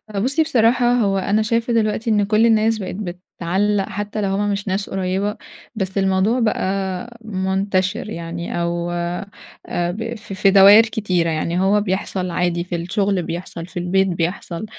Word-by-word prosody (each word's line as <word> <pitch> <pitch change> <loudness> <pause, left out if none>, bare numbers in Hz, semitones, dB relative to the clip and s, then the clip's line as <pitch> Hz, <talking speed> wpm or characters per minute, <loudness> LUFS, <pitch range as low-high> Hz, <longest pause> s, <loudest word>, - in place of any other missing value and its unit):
أ - - 0
بُصي 270 +9 +2
بصراحة، 245 -3 +3
هو 200 -5 +2
أنا 200 +3 +1
شايفة 230 +2 0
دلوقتي 225 0 0
إن 210 -2 +3
كل 215 +2 +3
الناس 225 0 +3
بقت 185 -2 -5
بتعلق 190 +1 -2
حتى 205 +1 -4
لو 195 - 0
هم 205 +1 0
مش 200 +1 -3
ناس 195 +1 -2
قريبة، 195 +2 -2 0.4
بس 190 -2 -3
الموضوع 195 +5 +2
بقى 195 0 -2
منتشر 190 -1 -1
يعني 170 -1 -4
أو 170 0 -2
آآ، 175 0 -4
ب 225 +5 -4
ف 210 -2 -9
في 195 0 +3
دواير 200 +3 +8
كتيرة، 195 -7 -1
يعني 170 +3 -1
هو 200 +2 +3
بيحصل 185 -1 -2
عادي 175 0 0
في 180 0 -5
الشغل، 195 +2 0
بيحصل 170 0 -6
في 180 - -11
البيت، 190 +2 +2
بيحصل 170 +1 -3
195 Hz, 160 wpm, -20 LUFS, 180-215 Hz, 0.4 s, دواير